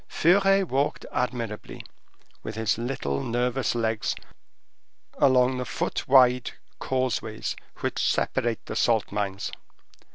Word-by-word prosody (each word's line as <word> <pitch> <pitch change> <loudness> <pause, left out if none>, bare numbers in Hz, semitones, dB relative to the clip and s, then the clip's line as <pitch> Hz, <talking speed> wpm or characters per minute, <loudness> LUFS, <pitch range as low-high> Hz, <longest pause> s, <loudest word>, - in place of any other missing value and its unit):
Furet 195 +3 +4
walked 140 +1 -1
admirably, 115 -4 -3 0.6
with 110 - -6
his 110 0 0
little 70 - -2
nervous 125 - 0
legs, 110 -2 0 1.0
along 130 -1 +4
the - - -1
foot - - -3
wide 125 -2 +5 0.3
causeways 125 -4 -2 0.3
which - - -1
separate 115 -1 0
the - - -6
salt 115 -3 +2
mines. 100 -1 -2
120 Hz, 105 wpm, -26 LUFS, 110-130 Hz, 1.0 s, wide